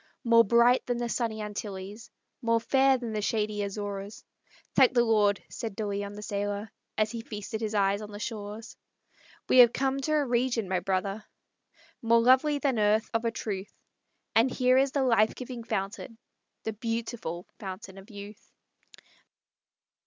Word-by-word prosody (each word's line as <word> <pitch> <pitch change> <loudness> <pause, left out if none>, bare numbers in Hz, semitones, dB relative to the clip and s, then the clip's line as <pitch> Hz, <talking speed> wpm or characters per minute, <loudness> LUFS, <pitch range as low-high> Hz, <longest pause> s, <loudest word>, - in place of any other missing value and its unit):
More 230 -1 +6
bright 235 +3 +4
than 245 -1 0
the 240 0 -2
sunny 225 -2 -2
Antilles, 210 +1 -7 0.3
More 230 -1 +2
fair 265 +3 +3
than 235 -3 -5
the 210 - -1
shady 210 -1 -1
Azores. 200 0 -5 0.5
"Thank 260 -1 +5
the 240 - +5
Lord!" 210 -3 +2
said 220 -4 -6
De 215 - -3
Leon, 200 0 -3
the 210 +1 -8
sailor 205 +1 -3 0.3
As 215 0 +1
feasted 220 -2 -6
his 215 -1 -2
eye 200 0 +2
on 210 -1 -8
the 205 - -8
shores, 215 0 -6 0.7
"We 255 - +5
have 240 -1 +8
come 270 +1 0
to 310 +3 -1
a 300 -2 +2
region, 240 -3 0
my 185 -1 0
brothers, 195 +3 -2 0.8
More 230 0 +4
lovely 260 +5 +4
than 275 -5 0
earth, 215 +1 +2
of 225 +1 0
a - - +3
truth; 200 -3 -5 0.6
And 230 +4 +4
here 255 0 +3
is 270 0 +2
the 275 -1 +1
life 225 -4 +3
giving 250 -2 -7
fountain, 210 +3 -4 0.5
The 220 - -3
beautiful 225 -5 -4
Fountain 190 0 -8
of 195 +4 -15
Youth." 205 0 -11
220 Hz, 160 wpm, -28 LUFS, 205-240 Hz, 0.8 s, have